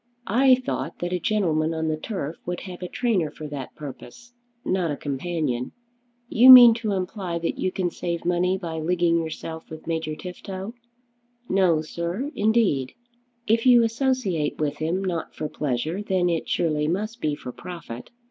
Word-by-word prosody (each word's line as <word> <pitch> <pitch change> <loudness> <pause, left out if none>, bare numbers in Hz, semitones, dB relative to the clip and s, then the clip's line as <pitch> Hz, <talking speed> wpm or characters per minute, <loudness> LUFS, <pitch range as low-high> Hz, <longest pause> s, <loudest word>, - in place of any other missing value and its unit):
"I 255 +5 +5
thought 255 0 -4
that 175 +1 -3
a 180 - 0
gentleman 165 -6 0
on 160 0 -1
the 155 - 0
turf 160 -2 -5
would 180 0 -3
have 185 -2 -9
a 180 - -4
trainer 200 -8 0
for 155 +1 -9
that 140 -3 -7
purpose; 235 - -10 0.3
not 185 -3 0
a 145 - -2
companion. 140 -3 -3 0.5
You 245 +2 +6
mean 245 -2 +12
to 215 -3 -1
imply 185 -2 -3
that 165 0 -3
you 185 - 0
can 180 -2 -1
save 170 -1 -4
money 180 +2 +1
by 165 -3 -5
leaguing 170 +1 +2
yourself 160 0 -6
with 160 0 -10
Major 160 -2 -2
Tifto?" 190 +4 -7 0.7
"No, 180 -5 +3
sir, 170 - -4
indeed." 210 - +2 0.5
"If 230 +3 +2
you 240 -2 +7
associate 230 - 0
with 150 -2 -2
him, 170 +5 -1
not 170 -3 -3
for 155 - -3
pleasure, 150 +6 -2
then 185 -3 +1
it 165 - -2
surely 150 -3 0
must 215 +8 -3
be 150 -1 0
for 125 - -8
profit. 165 -7 -9
175 Hz, 165 wpm, -24 LUFS, 155-205 Hz, 0.7 s, mean